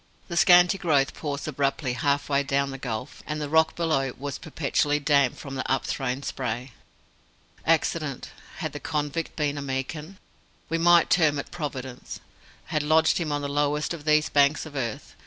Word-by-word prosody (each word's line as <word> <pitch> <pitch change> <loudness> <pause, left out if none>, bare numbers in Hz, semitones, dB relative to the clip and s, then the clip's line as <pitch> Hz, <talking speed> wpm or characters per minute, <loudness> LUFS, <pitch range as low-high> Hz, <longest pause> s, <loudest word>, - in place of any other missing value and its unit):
The 170 - -4
scanty 180 +2 +6
growth 145 -6 +2
paused 145 -2 -4
abruptly 140 -2 -1
half 140 +1 0
way 140 -1 +2
down 140 0 0
the 135 - -7
gulf, 115 -4 -5
and 150 0 -3
the 150 - -3
rock 160 +2 +3
below 155 -6 0
was 140 +1 -5
perpetually 145 -1 0
damp 140 -3 +2
from 140 - -8
the 130 -1 -3
upthrown 135 0 -1
spray. 125 0 -4 1.0
Accident - - 0 0.3
had - - -4
the - - -5
convict 150 +1 -3
been 145 -2 -1
a - - -4
Meekin, 145 +6 -4 0.5
we 165 +1 0
might 175 0 +5
term 155 -4 +4
it 145 - -5
Providence 135 -6 -6 0.5
had 150 - +2
lodged 160 +3 +3
him 160 -3 -2
on 145 0 -1
the - - -1
lowest 145 +2 0
of 155 -3 -8
these 155 0 +4
banks 145 +2 +3
of 150 -2 -11
earth. 120 -5 -4
145 Hz, 175 wpm, -26 LUFS, 135-155 Hz, 1.0 s, scanty